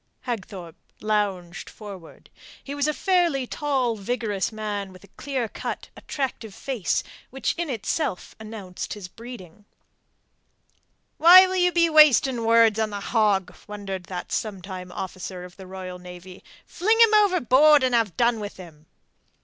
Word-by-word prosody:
Hagthorpe 190 Hz, -8 st, -6 dB, 0.2 s
lounged 200 Hz, -5 st, -2 dB
forward. 195 Hz, -6 st, -12 dB, 0.3 s
He 280 Hz, -, -6 dB
was 285 Hz, 0 st, 0 dB
a -, -, +2 dB
fairly 345 Hz, -8 st, +1 dB
tall, 260 Hz, -4 st, -1 dB
vigorous 210 Hz, -1 st, -2 dB
man 205 Hz, -3 st, -4 dB
with 185 Hz, 0 st, -15 dB
a 200 Hz, -, -17 dB
clear 265 Hz, -5 st, -4 dB
cut, -, -, -6 dB
attractive 250 Hz, -7 st, -5 dB
face 255 Hz, -9 st, -2 dB, 0.3 s
which 270 Hz, +1 st, -2 dB
in 340 Hz, -2 st, -3 dB
itself 240 Hz, -, -3 dB
announced 215 Hz, -5 st, -7 dB
his 200 Hz, -3 st, -8 dB
breeding. 210 Hz, -3 st, -12 dB, 1.6 s
"Why 360 Hz, +3 st, +9 dB
will 375 Hz, 0 st, -3 dB
you 360 Hz, 0 st, +3 dB
be 340 Hz, -1 st, +3 dB
wasting 280 Hz, -6 st, +5 dB
words 225 Hz, -1 st, +4 dB
on 220 Hz, -1 st, 0 dB
the 205 Hz, -1 st, -5 dB
hog?" 205 Hz, -3 st, +1 dB
wondered 195 Hz, -3 st, -6 dB
that 180 Hz, 0 st, -7 dB
sometime 190 Hz, -3 st, -5 dB
officer 185 Hz, 0 st, -6 dB
in 180 Hz, -, -10 dB
the 190 Hz, -1 st, -12 dB
Royal 185 Hz, -1 st, -8 dB
Navy. 180 Hz, +1 st, -12 dB, 0.2 s
"Fling 440 Hz, +6 st, +1 dB
him 455 Hz, -2 st, +6 dB
overboard 305 Hz, -, +5 dB
and 255 Hz, -1 st, +1 dB
have 225 Hz, -7 st, +1 dB
done 235 Hz, -1 st, +2 dB
with 205 Hz, -1 st, -7 dB
him." 160 Hz, -4 st, -13 dB
215 Hz, 145 wpm, -24 LUFS, 190-270 Hz, 1.6 s, Why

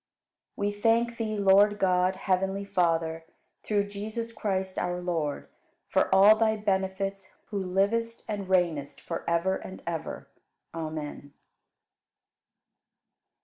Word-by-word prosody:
59. 200 Hz, -, 0 dB
We 205 Hz, -, +1 dB
thank 230 Hz, +1 st, +2 dB
Thee, 215 Hz, -1 st, -2 dB
Lord 200 Hz, +1 st, +5 dB
God, 185 Hz, -1 st, +2 dB
heavenly 190 Hz, +1 st, 0 dB
Father, 165 Hz, -4 st, 0 dB, 0.4 s
through 205 Hz, -1 st, +1 dB
Jesus 220 Hz, +3 st, -5 dB
Christ, 190 Hz, -3 st, -2 dB
our 180 Hz, 0 st, -1 dB
Lord, 165 Hz, -5 st, -2 dB, 0.4 s
for -, -, +2 dB
all 195 Hz, +3 st, +8 dB
Thy 220 Hz, 0 st, +2 dB
benefits, 195 Hz, -1 st, -2 dB, 0.2 s
who 200 Hz, -2 st, -1 dB
livest 205 Hz, +5 st, 0 dB
and 205 Hz, -3 st, -4 dB
reignest 170 Hz, -6 st, 0 dB
forever 170 Hz, +2 st, -1 dB
and 190 Hz, -, -10 dB
ever. 165 Hz, -1 st, -5 dB, 0.5 s
Amen. 155 Hz, -3 st, -6 dB
190 Hz, 110 wpm, -28 LUFS, 175-205 Hz, 0.5 s, all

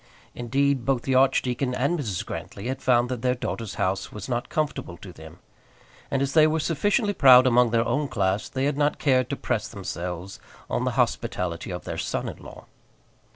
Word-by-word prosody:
Indeed 135 Hz, +2 st, 0 dB
both 130 Hz, -1 st, 0 dB
the 135 Hz, -, -1 dB
archdeacon 130 Hz, -1 st, +2 dB
and 145 Hz, +7 st, 0 dB
Mrs. 105 Hz, -10 st, -3 dB
Grantly 100 Hz, -, -7 dB
had 130 Hz, 0 st, -4 dB
found 120 Hz, -1 st, +3 dB
that 125 Hz, -3 st, -4 dB
their 125 Hz, 0 st, +1 dB
daughter's 115 Hz, -4 st, -5 dB
house 95 Hz, 0 st, -1 dB
was 105 Hz, -2 st, -7 dB
not 120 Hz, -1 st, -2 dB
comfortable 150 Hz, -, -3 dB
to 90 Hz, +1 st, -11 dB
them, 80 Hz, +1 st, -13 dB, 0.7 s
and 135 Hz, 0 st, 0 dB
as 140 Hz, -, -2 dB
they 155 Hz, -1 st, +6 dB
were 160 Hz, +1 st, 0 dB
sufficiently 205 Hz, +7 st, +1 dB
proud 130 Hz, -6 st, +7 dB
among 125 Hz, -1 st, +4 dB
their 115 Hz, 0 st, +1 dB
own 145 Hz, +4 st, 0 dB
class 100 Hz, -3 st, -1 dB
they 130 Hz, 0 st, -2 dB
had 145 Hz, 0 st, -1 dB
not 145 Hz, 0 st, +2 dB
cared 130 Hz, -3 st, +2 dB
to 140 Hz, -, -1 dB
press 120 Hz, -5 st, -2 dB
themselves 90 Hz, -2 st, -6 dB, 0.3 s
on -, -, 0 dB
the -, -, 0 dB
hospitality 85 Hz, -1 st, -1 dB
of 90 Hz, -, -5 dB
their -, -, -5 dB
son -, -, -2 dB
in -, -, -6 dB
law. -, -, -12 dB
125 Hz, 195 wpm, -25 LUFS, 100-140 Hz, 0.7 s, proud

